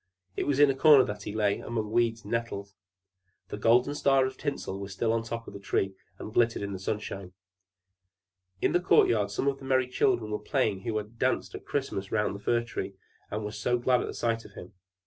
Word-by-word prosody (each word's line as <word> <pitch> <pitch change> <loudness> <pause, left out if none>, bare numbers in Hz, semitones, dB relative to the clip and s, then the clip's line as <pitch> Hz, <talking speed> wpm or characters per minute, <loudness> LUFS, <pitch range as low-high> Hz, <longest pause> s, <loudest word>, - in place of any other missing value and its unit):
It - - -2
was 140 -1 +1
in 145 -1 +7
a - - -4
corner 145 -1 +7
that 105 -2 -5
he 105 +1 -6
lay, 105 -2 +1
among 110 -2 -3
weeds 115 0 +1
and - - -9
nettles. 110 -4 -3 0.8
The - - -5
golden 120 +6 +3
star 135 -2 +3
of 130 0 -4
tinsel 140 -9 -4
was 100 -1 -6
still 110 +4 0
on 115 - +1
the 115 - -10
top 115 0 -4
of - - -9
the 100 - -8
Tree, 95 0 -1 0.2
and 110 - -8
glittered 115 -3 +2
in 100 0 -4
the 95 - -5
sunshine. 95 -2 -4 1.3
In - - +3
the 175 - +3
court 180 - +5
yard 105 -3 +1
some 100 +7 -2
of 135 -1 0
the 135 - -10
merry 130 -1 +2
children 120 -3 +1
were 105 - -1
playing 110 -9 0
who 110 +1 -2
had 110 +2 -7
danced 130 - 0
at - - -8
Christmas 100 -9 -3
round 105 -2 +1
the 100 - -7
Fir 120 +3 +1
Tree, 100 -4 -5 0.3
and 105 +1 -3
were 105 - -4
so 110 +4 0
glad 125 +1 +2
at - - -3
the - - -6
sight 115 -1 -1
of - - -14
him. 90 - -11
115 Hz, 235 wpm, -28 LUFS, 105-130 Hz, 1.3 s, in